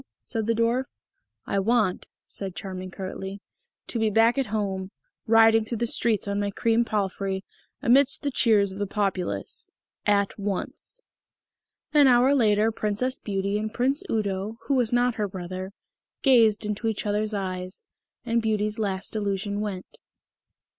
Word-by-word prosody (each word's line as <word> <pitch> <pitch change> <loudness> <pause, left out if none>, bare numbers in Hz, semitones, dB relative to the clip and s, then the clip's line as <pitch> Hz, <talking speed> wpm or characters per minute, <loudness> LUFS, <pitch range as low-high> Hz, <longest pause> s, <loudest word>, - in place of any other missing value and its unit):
said 225 -1 -3
the 230 - +2
Dwarf. 230 +3 +1 0.6
"I 200 - 0
want," 215 -2 +1 0.2
said 190 -3 -5
Charming 185 -1 -6
curtly, 190 +1 -6 0.5
"to 235 - -3
be 220 -1 +2
back 225 +5 +4
at 265 - 0
home, 195 -3 -2 0.4
riding 225 0 +6
through 230 +2 -4
the 235 - 0
streets 225 -3 +1
on 200 0 -1
my 205 0 0
cream 230 +3 +2
palfrey, 195 -3 -2 0.4
amidst 275 +3 +4
the 285 - 0
cheers 210 -6 +3
of 190 - -8
the 205 - -1
populace.... 190 - -3 0.4
At 200 0 +2
once." 205 - -4 0.9
An 290 -2 +7
hour 250 +2 +5
later 220 -4 +3
Princess 215 +4 -1
Beauty 200 0 -1
and 215 0 -3
Prince 260 +5 +1
Udo, 205 0 -2
who 280 - -1
was 245 -4 +2
not 245 0 +2
her 205 - +1
brother, 185 0 -6 0.5
gazed 225 -5 +5
into 210 +2 -2
each 220 -1 -2
other's 210 +1 0
eyes; 185 -1 -4 0.4
and 235 -1 +1
Beauty's 215 -1 -1
last 200 0 -2
illusion 205 0 -2
went. 200 -3 -5
210 Hz, 150 wpm, -26 LUFS, 195-230 Hz, 0.9 s, An